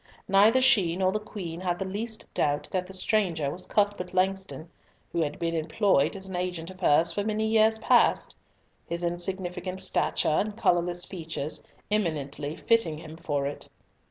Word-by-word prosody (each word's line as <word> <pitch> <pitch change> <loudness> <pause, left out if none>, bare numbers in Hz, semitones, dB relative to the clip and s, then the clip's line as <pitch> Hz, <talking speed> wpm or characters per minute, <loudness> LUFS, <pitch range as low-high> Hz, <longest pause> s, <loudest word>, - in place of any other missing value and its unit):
Neither 210 +6 +5
she 190 -10 +4
nor 185 0 +2
the 215 - -1
Queen 180 -5 -7
had 175 -1 -1
the 190 - -3
least 220 +4 -3
doubt 145 0 0
that 185 -1 -1
the 190 - -10
stranger 185 -7 0
was 180 - -4
Cuthbert 200 -3 0
Langston, 190 -2 0 0.4
who 170 - 0
had 145 -2 -2
been 165 -1 -2
employed 165 -1 +2
as 190 0 -6
an 190 - -6
agent 180 -1 -3
of 185 - -14
hers 165 -2 +4
for 205 - -2
many 215 +1 -1
years 220 0 +4
past; 220 - +3 0.5
his 170 +1 -3
insignificant 180 +1 -3
stature 190 - +2
and 205 +7 0
colourless 175 -2 +1
features 160 -4 -4 0.3
eminently 150 -7 -1
fitting 225 -10 +1
him 155 0 -10
for 145 -4 -2
it. 145 +1 -5
180 Hz, 165 wpm, -27 LUFS, 165-200 Hz, 0.5 s, Neither